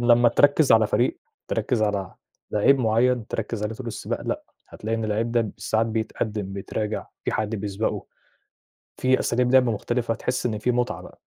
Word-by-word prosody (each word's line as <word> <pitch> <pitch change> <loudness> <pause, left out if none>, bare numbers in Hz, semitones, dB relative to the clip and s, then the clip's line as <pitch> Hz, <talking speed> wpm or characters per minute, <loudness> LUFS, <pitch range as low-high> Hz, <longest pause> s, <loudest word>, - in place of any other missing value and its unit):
لمّا 120 0 +5
تركِّز 145 +2 +4
على 110 -1 +6
فريق، 120 +4 +1 0.3
تركِّز 115 -4 0
على 100 -3 -1 0.4
لعيب 135 +6 +4
معيّن، 120 0 +2
تركِّز 110 -1 -3
عليه 105 +1 -2
طول 125 +2 -8
السباق، 115 - -4
لأ، - - -3 0.2
هتلاقي 115 +1 -3
إن 115 - -2
اللعيب 110 +2 -1
ده 115 -4 +1
ساعات 110 +3 +1
بيتقدِّم، 110 -2 -3
بيتراجع، 105 +2 -3 0.2
في - - -1
حد 110 0 -1
بيسبقه، 105 +1 -2 0.9
في 130 0 +2
أساليب 125 +1 +1
لعب 130 -2 +6
مختلفة، 115 +2 -1
تحس 125 +3 -2
إن 110 -3 -1
في 115 +4 0
متعة 120 0 -1
بقى. - - -14
115 Hz, 170 wpm, -24 LUFS, 105-120 Hz, 0.9 s, على